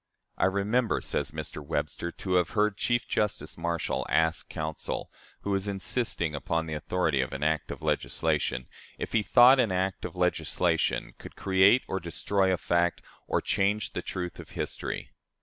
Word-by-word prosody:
"'I - - +4
remember,' 105 +5 +1
says - - -1
Mr. 75 - -6
Webster, 85 +4 -2
'to 95 +1 -4
have 90 -1 +3
heard 105 -1 +3
Chief 120 +3 0
Justice 105 -1 -1
Marshall 85 0 -2
ask 80 0 +2
counsel, 80 -1 -4 0.3
who 100 - -3
was 95 0 0
insisting 95 -4 0
upon 80 +3 -1
the 80 - -5
authority 75 -2 0
of 65 +1 -3
an 70 +2 -3
act 80 -1 0
of - - -7
legislation, 75 -6 0 0.3
if - - -4
he 110 - +4
thought 125 +5 +7
an 115 -6 +3
act 95 +1 -1
of - - -5
legislation 90 0 0
could - - -11
create 95 +5 +4
or 95 - -2
destroy 95 +2 0
a 90 - +2
fact, 85 0 +1 0.2
or - - +1
change 100 +2 0
the - - -2
truth 90 -1 -5
of - - -10
history? - - -4
90 Hz, 165 wpm, -28 LUFS, 80-100 Hz, 0.3 s, thought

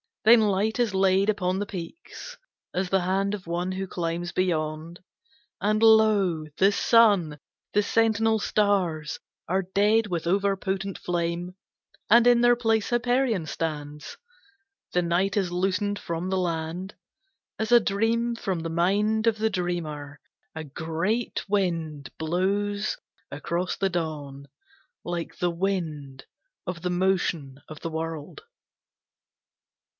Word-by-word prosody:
Then 225 +1 +7
light 210 +2 +1
is 235 -4 +1
laid 190 +1 +3
upon 185 -3 0
the 205 - -2
peaks, 205 - -8 0.4
As 185 0 -1
the 190 0 +2
hand 195 +3 0
of 200 -3 -5
one 175 +2 -2
who 190 +1 -3
climbs 170 0 -3
beyond; 160 -2 -2 0.6
And, 215 +1 +1
lo! 215 -7 +4
the 195 +2 +5
Sun! 200 -9 +4 0.3
The 210 - +3
sentinel 225 0 +2
stars 185 -8 0 0.3
Are 190 +3 +1
dead 210 +4 +2
with 170 -4 -3
overpotent 195 +1 -1
flame, 175 +1 -2 0.5
And 235 +3 +7
in 240 -1 +5
their 240 0 +5
place 225 -3 +1
Hyperion 240 -5 +1
stands. 150 -2 -5 0.8
The 180 - +3
night 180 +4 0
is 185 -3 0
loosened 190 +3 0
from 170 +1 -4
the 190 - 0
land, 175 +2 -3 0.6
As 220 +1 -2
a 240 - +8
dream 230 +3 0
from 195 -6 -2
the 165 0 -4
mind 205 +6 +1
of 225 -1 +2
the 220 +1 +1
dreamer. 155 -6 -4 0.4
A 160 - -5
great 165 - -2
wind 165 -9 -1
blows 200 +5 -1 0.3
across 170 +5 -2
the 195 - 0
dawn, 150 -5 -4 0.6
Like 175 -1 -4
the 175 -1 0
wind 160 -7 -3 0.4
of 180 -2 -5
the 180 - -1
motion 175 -7 0
of 155 -1 -10
the 165 - -3
world. 160 - -5
185 Hz, 130 wpm, -26 LUFS, 165-210 Hz, 0.8 s, a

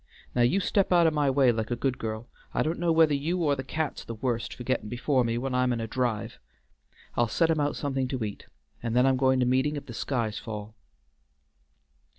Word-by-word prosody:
Now 125 - +1
you 120 +11 +3
step 195 0 +1
out 175 -2 +5
o' 160 - +4
my 150 -2 +1
way 135 -2 +4
like 110 -1 -2
a 120 - 0
good 130 +2 -1
girl. 110 +1 -4 0.3
I - - +2
don't 160 +2 -2
know 170 -1 +2
whether 160 -2 +5
you 155 +6 0
or 145 -2 +3
the 130 - -5
cat's 155 +3 -3
the 115 - -7
worst 120 0 -2
for 125 - -8
gettin' 120 -4 -1
before 125 +2 +1
me 115 0 -1
when 130 +2 -2
I'm 125 0 +2
in 120 - -1
a 115 - -2
drive. 120 -2 -2 0.8
I'll 120 - +2
set 165 +8 +2
him 160 - +1
out 145 0 0
somethin' 135 -2 -1
to 130 -2 -3
eat, 105 -2 -6 0.3
and 115 0 -2
then 125 +1 +5
I'm 135 0 +4
goin' 130 0 +3
to - - +3
meetin' 130 +4 +2
if 145 - -6
the 120 - -9
skies 115 -3 -2
fall." 105 -1 -7
130 Hz, 230 wpm, -27 LUFS, 120-145 Hz, 0.8 s, out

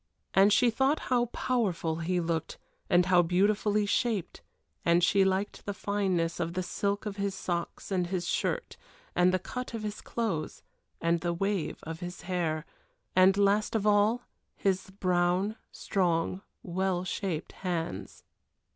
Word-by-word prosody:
And 195 +2 +6
she 240 +3 +5
thought 265 +6 +2 0.2
how 240 -1 +4
powerful 195 -10 -1
he 175 +2 0
looked, 165 -2 -2 0.3
and 175 0 +5
how 180 -1 +5
beautifully 205 +4 +2
shaped; 210 -4 -1 0.4
and 170 +1 +4
she 195 +2 +5
liked 190 +1 -1
the 205 - -2
fineness 190 -5 0
of 170 0 -1
the 185 - 0
silk 200 +3 -2
of 205 -1 -4
his 200 -1 -1
socks 175 +1 -4
and 180 -2 +1
his 175 -1 -2
shirt, - - -1 0.4
and 180 +1 +5
the 185 - +2
cut 250 +6 -6
of 220 - -5
his 210 -1 -4
clothes, 210 -10 -3 0.4
and 170 0 +2
the 175 0 0
wave 195 -2 -1
of 160 +1 -6
his 175 -1 -6
hair 170 -4 -1 0.5
and 185 +1 +6
last 205 +2 +2
of 215 -2 +1
all, 210 +3 +3 0.3
his 190 -1 0
brown, 185 +1 +1 0.2
strong, 180 -1 0 0.2
well 185 0 -1
shaped 180 -3 -3
hands. 165 - -4
190 Hz, 150 wpm, -29 LUFS, 175-205 Hz, 0.5 s, And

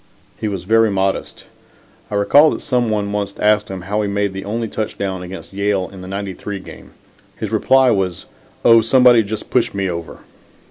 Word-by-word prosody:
He 110 - -2
was 95 -4 -4
very 115 +3 +3
modest. 95 -1 -2 0.7
I 105 - -4
recall 145 +10 +5
that - - -4
some 125 -3 0
one 105 -1 -1
once 100 -1 -3
asked 105 0 +2
him 95 -1 -6
how 105 +3 -2
he 105 - -1
made 100 -1 -1
the 95 0 -6
only 115 +3 -2
touchdown 100 -3 -4
against 90 +2 -9
Yale 100 -1 0
in 95 - -10
the 90 - -9
'93 100 +1 -5
game. 95 - -13 0.4
His - - -5
reply 130 -1 +4
was: 95 -4 -1 0.4
"Oh, 115 -1 +7
somebody 120 0 +5
just 110 0 -6
pushed 125 -5 +1
me 100 -1 -1
over." 85 -2 -6
100 Hz, 185 wpm, -18 LUFS, 95-110 Hz, 0.7 s, Oh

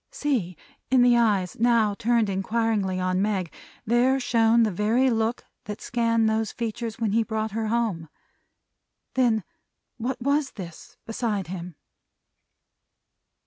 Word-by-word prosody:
See! 265 - -2 0.3
In 255 -1 +5
the 245 -1 +5
eyes, 205 -6 +1
now 230 -3 +3
turned 230 +1 +1
inquiringly 200 -1 0
on 185 0 0
Meg, 195 -5 -1 0.3
there 245 +4 +3
shone 230 -2 +3
the 215 - +1
very 225 +7 +2
look 225 +1 -1 0.2
that 210 0 -6
scanned 230 -1 +1
those 220 -1 0
features 230 -1 -4
when 225 -3 -1
he 225 +2 +3
brought 220 -1 -2
her 220 +1 -2
home! 215 -9 -1 1.0
Then 235 -5 +2 0.5
what 250 +3 -3
was 280 +2 0
this, 170 -5 -10
beside 220 -4 -2
him? 180 -2 -6
225 Hz, 130 wpm, -25 LUFS, 205-235 Hz, 1.0 s, In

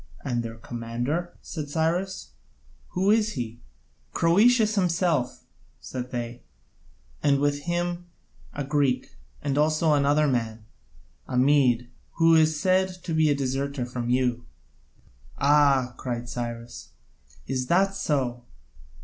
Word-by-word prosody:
"And 120 -2 0
their 115 -1 -6
commander?" 120 +9 -4
said 155 -5 -6
Cyrus, 175 +5 -1 0.6
"who 190 +3 +2
is 215 -1 +2
he?" 120 -3 -5 0.5
"Croesus 215 +6 +4
himself," 170 - 0 0.4
said 125 -1 -6
they, 120 -1 -5 0.8
"and 140 -1 +3
with 145 0 +1
him 175 0 -2 0.4
a 145 - -4
Greek, 135 -3 0 0.3
and 140 0 0
also 155 +1 +3
another 145 +1 +3
man, 115 -4 -2 0.6
a 125 - -2
Mede, 125 -3 +3 0.2
who 165 0 +4
is 155 -1 +4
said 185 +2 +3 0.2
to 170 - -3
be 160 -1 +3
a 145 - +3
deserter 135 0 -2
from 120 -1 -4
you." 125 -1 +1 0.9
"Ah," 140 -3 +3
cried 120 -1 -4
Cyrus, 120 -1 -6 0.5
"is 130 -1 -2
that 195 +5 +3
so? 130 -9 -1
140 Hz, 120 wpm, -26 LUFS, 125-165 Hz, 0.9 s, Croesus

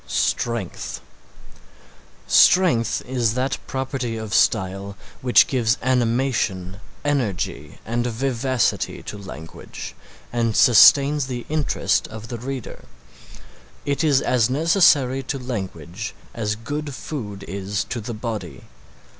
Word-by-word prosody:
STRENGTH 115 - -2 1.3
Strength 165 - +4
is 120 -3 0
that 130 +1 -1
property 130 -3 -3
of 110 -2 -5
style 100 -1 +1 0.2
which 125 -1 +6
gives 120 -3 +1
animation, 120 -7 0 0.3
energy 130 -11 -2
and 120 +2 -1
vivacity 125 0 -1
to - - -7
language 95 -5 -9 0.4
and 115 -2 0
sustains 140 +4 +6
the 120 -2 -5
interest 145 -10 0
of 110 0 -9
the 120 - -5
reader. 130 -3 -6 1.0
It 140 +2 0
is 145 -4 +4
as 125 -4 +2
necessary 145 -3 +4
to 135 +1 -4
language 100 - -5 0.2
as 105 -2 -2
good 145 +5 -5
food 110 -6 -6
is 100 +1 -3
to 120 - -5
the 115 +1 -5
body. 105 - -5
120 Hz, 110 wpm, -22 LUFS, 105-130 Hz, 1.3 s, which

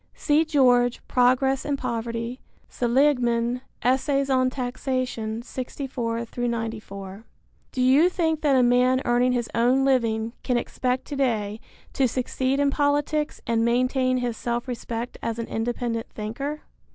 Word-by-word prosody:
(See 300 +1 +2
George, 250 -5 +3
Progress 255 +2 +3
and 285 -1 -1
Poverty; 235 0 -3 0.3
Seligman, 245 -2 +1 0.2
Essays 275 +2 +1
on 255 -1 +3
Taxation, 250 -3 -3
64 245 -3 -4
94.) 225 -4 -4 0.5
Do 255 - -1
you 275 +7 +5
think 320 -4 0
that 285 -3 +3
a 255 - +5
man 250 +2 +3
earning 245 +1 +3
his 240 -2 -1
own 250 +3 +3
living 230 -4 +1
can 250 -2 0
expect 250 +1 -2
to 290 - -6
day 220 -6 0 0.3
to 270 - +2
succeed 260 +2 -1
in 285 -1 +3
politics 295 +1 0
and 230 -1 +1
maintain 255 +2 +2
his 245 -2 -2
self 240 +1 -2
respect 235 -1 -5
as 230 -1 -3
an 230 - -3
independent 230 0 -2
thinker? 275 +8 -5
250 Hz, 135 wpm, -25 LUFS, 235-270 Hz, 0.5 s, you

